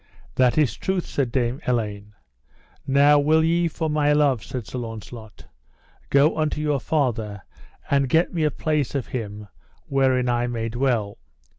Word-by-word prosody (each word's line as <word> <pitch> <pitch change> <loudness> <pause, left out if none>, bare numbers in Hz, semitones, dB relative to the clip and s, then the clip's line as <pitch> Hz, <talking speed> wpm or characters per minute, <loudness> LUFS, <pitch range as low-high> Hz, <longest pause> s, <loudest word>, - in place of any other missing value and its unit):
That 125 +1 +2
is 135 -10 +2
truth, 190 -2 -2
said 135 -4 -2
Dame 125 +1 -1
Elaine. 105 -4 -2 0.7
Now 140 +2 +5
will 155 +2 +3
ye 170 +1 +2
for 160 0 -3
my 150 -1 +2
love, 140 -7 +2
said 125 -4 -6
Sir 125 - -6
Launcelot, 115 -1 -9 0.6
go 140 +3 +4
unto 155 -1 0
your 150 -2 0
father 115 -9 -1 0.4
and 140 -2 +1
get 165 +7 +2
me 165 -3 0
a 150 - +3
place 150 -2 -1
of 135 - -3
him 105 -4 -5 0.4
wherein 130 -2 +1
I 120 0 +1
may 115 -2 -3
dwell? 120 -4 -1
130 Hz, 155 wpm, -23 LUFS, 115-150 Hz, 0.7 s, Now